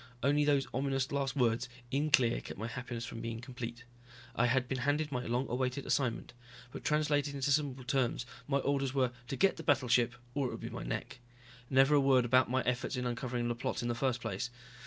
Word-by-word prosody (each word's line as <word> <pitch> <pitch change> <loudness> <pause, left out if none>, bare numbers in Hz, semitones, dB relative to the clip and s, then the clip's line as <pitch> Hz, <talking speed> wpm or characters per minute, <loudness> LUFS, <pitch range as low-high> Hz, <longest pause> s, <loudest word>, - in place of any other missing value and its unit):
Only 145 +2 +4
those 145 -2 +3
ominous 135 0 0
last 140 -1 -1
words 120 -1 +1 0.2
in 145 +3 +1
clear 130 -5 +4
kept - - -8
my 110 - -3
happiness 120 0 -5
from 115 - -7
being 115 -1 -4
complete. 120 -1 -7 0.5
I 125 - +3
had 125 +1 +2
been 130 0 -2
handed 145 +3 0
my 125 -2 -2
long 125 +3 0
awaited 125 +2 -1
assignment. 125 -5 0 0.4
But - - -8
translated 145 -2 +1
into 140 0 0
simple 140 -3 +1
terms 130 -2 0 0.2
my 140 -1 +2
orders 140 -1 0
were 130 -2 +2 0.2
to 135 - -3
get 195 +6 +3
the 160 - -6
battleship, 125 -4 +3 0.2
or 140 -1 0
it - - -4
would - - -6
be - - -5
my - - -5
neck. - - -4 0.5
Never 135 +2 +5
a 145 - +6
word 130 -2 +4
about 130 +1 +4
my 130 +1 +1
efforts 125 +2 -1
in 125 0 -2
uncovering 120 0 -2
the 120 - 0
plot 120 0 -3
in 120 - -1
the - - +1
first 120 0 0
place. 110 +2 -3
130 Hz, 215 wpm, -33 LUFS, 120-140 Hz, 0.5 s, a